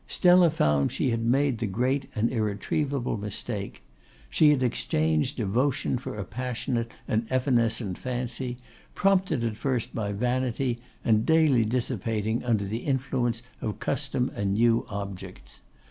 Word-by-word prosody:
Stella 180 -1 +5
found 75 - +2
she 130 - 0
had 115 0 0
made 130 +1 +2
the 115 - -1
great 130 +7 0
and 110 +1 +1
irretrievable 120 +4 -1
mistake. 105 0 -5 0.5
She 155 - +5
had 140 -3 +3
exchanged 80 - 0
devotion 125 +4 0
for 125 - -6
a 105 - -3
passionate 120 +1 -3 0.2
and 110 +1 0
evanescent 115 -6 +1
fancy, 125 0 -3 0.4
prompted 185 -9 +2
at 110 -2 -2
first 130 -4 -1
by 105 -2 -2
vanity, 125 +2 -1 0.3
and 110 -1 +4
daily 155 -7 +4
dissipating 115 -2 -1
under 110 -5 +1
the 105 +3 -3
influence 125 -3 -1 0.2
of 105 - -3
custom 135 -2 -1
and 100 -1 0
new 115 +1 +3
objects. 100 -2 -7
120 Hz, 135 wpm, -27 LUFS, 110-130 Hz, 0.5 s, Stella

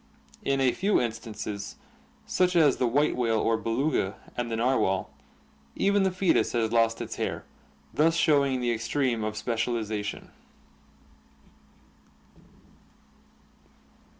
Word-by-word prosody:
In 135 0 0
a 130 -2 +3
few 200 +8 +1
instances, 110 -3 -5 0.5
such 180 0 +1
as 150 -5 +5
the 125 - +1
white 145 +6 +2
whale 115 -3 +1
or 115 +1 +2
Beluga 115 -1 -1 0.2
and 120 -1 -3
the 115 - -2
narwhal, 115 -6 +1 0.6
even 200 0 +2
the 190 - +3
foetus 185 0 +1
has 115 -2 0
lost 115 -1 +2
its - - -6
hair, - - -3 0.5
thus 165 +2 +3
showing 140 -6 +2
the 120 -1 +1
extreme 115 0 -1
of 110 0 -3
specializa 110 -1 -2
tion. 105 - -7
120 Hz, 120 wpm, -27 LUFS, 110-145 Hz, 0.6 s, as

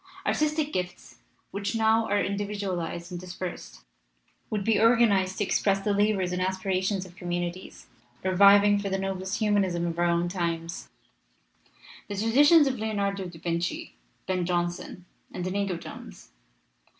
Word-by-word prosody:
Artistic 305 0 0
gifts, 180 0 -5 0.3
which 200 +2 -3
now 225 0 +3
are 205 0 +2
individualized 195 -4 -3
and 175 -1 -5
dispersed, 180 0 -7 0.7
would 210 -2 -2
be 215 0 +2
organized 215 -5 +4
to - - +1
express 195 0 +1
the 205 +1 0
labors 200 -3 +1
and 180 0 -2
aspirations 190 +1 -1
of 175 -1 -14
communities, 175 +1 -5 0.4
reviving, 200 +2 +6
for 200 -1 -3
the 195 - 0
noblest 190 0 -3
humanism 200 -5 +1
of 170 0 -3
our 175 - +3
own 170 0 +1
times, 170 -2 -3 1.2
the 205 - -5
traditions 285 - +5
of 260 -4 -1
Leonardo 200 -3 -2
da 170 -2 -11
Vinci, 170 +1 -3 0.3
Ben 185 -1 -1
Jonson, 175 0 -3 0.3
and 180 - -5
Inigo 195 -1 -1
Jones. - - -11
190 Hz, 140 wpm, -27 LUFS, 180-205 Hz, 1.2 s, reviving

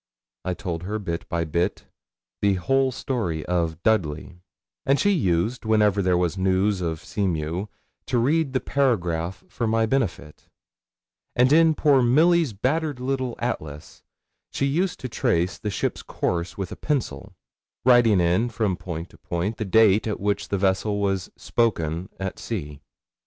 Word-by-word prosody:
I 90 -1 -2
told 85 -4 -4
her, 100 +4 -3
bit 85 -5 -5
by 85 -1 0
bit, 85 +5 -1 0.6
the 100 -1 +3
whole 135 +8 +1
story 105 - -3
of 85 -2 -1
Dudley, 85 -5 0 0.4
and 140 +1 +2
she 205 - +3
used, 110 - 0
whenever 105 -2 +3
there 90 -2 +2
was 90 +1 0
news 95 +1 +1
of 80 -2 -2
the - - -17
Seamew, 90 -1 -2 0.4
to 125 - +1
read 140 +4 +1
the 130 - +2
paragraph 95 -12 0
for 115 - -3
my 110 0 +2
benefit; 110 - -2 0.9
and 125 +3 +4
in 160 0 +5
poor 145 -4 +4
Milly's 155 +4 +4
battered 140 +7 -1
little 130 -1 -2
Atlas 75 -10 -5 0.5
she 140 - -1
used 170 +7 0
to 130 - -3
trace 90 -6 0
the 105 - -3
ship's 100 - -2
course 85 -1 -3
with 95 -3 -4
a - - -5
pencil, 145 -5 -3 0.5
writing 120 -6 +6
in, 90 +7 +2
from 105 -6 -1
point 85 -2 -6
to - - -19
point, 90 +6 -3
the 110 - -3
date 110 +1 +4
at 105 - -2
which 100 +1 -1
the 100 - -1
vessel 100 +2 +1
was 95 -2 -1
'spoken' 90 -7 -1
at 95 -1 -4
sea. 75 -10 -5
100 Hz, 155 wpm, -24 LUFS, 85-125 Hz, 0.9 s, writing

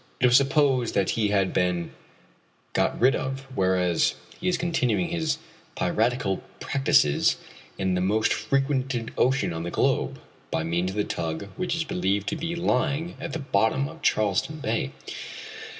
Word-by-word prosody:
It - - +3
was 125 -1 +6
supposed 135 -3 +3
that 100 - +2
he 110 -2 +1
had 100 -2 +1
been 90 -2 0 0.8
got - - +1
rid 130 +3 +5
of, 135 0 -3
whereas 90 -4 +2 0.2
he 180 - -3
is 180 - +2
continuing 170 -2 +1
his 160 -3 0 0.4
piratical 115 -4 +1 0.2
practices 135 - +3 0.4
in 95 -1 0
the 90 - +1
most 105 +4 +2
frequented 135 -4 -1
ocean 130 - +2
on 80 - -4
the 85 - -3
globe, - - 0 0.3
by - - -1
means 85 +3 0
of 95 - -6
the 105 - +2
tug 85 +2 -3
which 180 -2 -1
is 165 - 0
believed 100 - 0
to 160 - -2
be 165 +2 -3
lying 160 +1 0
at - - -5
the - - -1
bottom 135 0 +1
of 165 +2 -11
Charleston 110 +9 +1
Bay. 110 - -1
120 Hz, 160 wpm, -26 LUFS, 95-140 Hz, 0.8 s, was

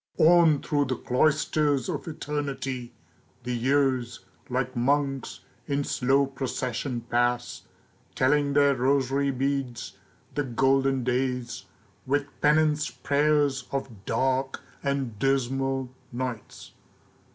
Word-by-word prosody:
ON 165 -3 +5
through 145 -1 +1
the 130 -1 -1
cloisters 145 +1 +1
of 150 -5 -4
eternity 140 -5 -4 0.5
The 125 +1 -3
years, 130 -1 +1 0.3
like 130 0 -1
monks, 135 +2 0 0.3
in 140 -1 0
slow 135 +1 +2
procession 130 -2 -3
pass, 120 +1 0 0.5
Telling 140 +2 +2
their 140 0 +5
rosary 135 +1 +1
beads, 130 -7 -2 0.4
the 145 - 0
golden 135 +1 +2
days, 125 -1 -2 0.4
With 140 +1 +1 0.2
penance 150 0 +3
prayers 145 -2 +1
of 135 -2 -3
dark 130 +3 0 0.2
and 135 -6 -2
dismal 135 0 0 0.2
nights. 125 -3 -6
135 Hz, 100 wpm, -26 LUFS, 125-145 Hz, 0.5 s, ON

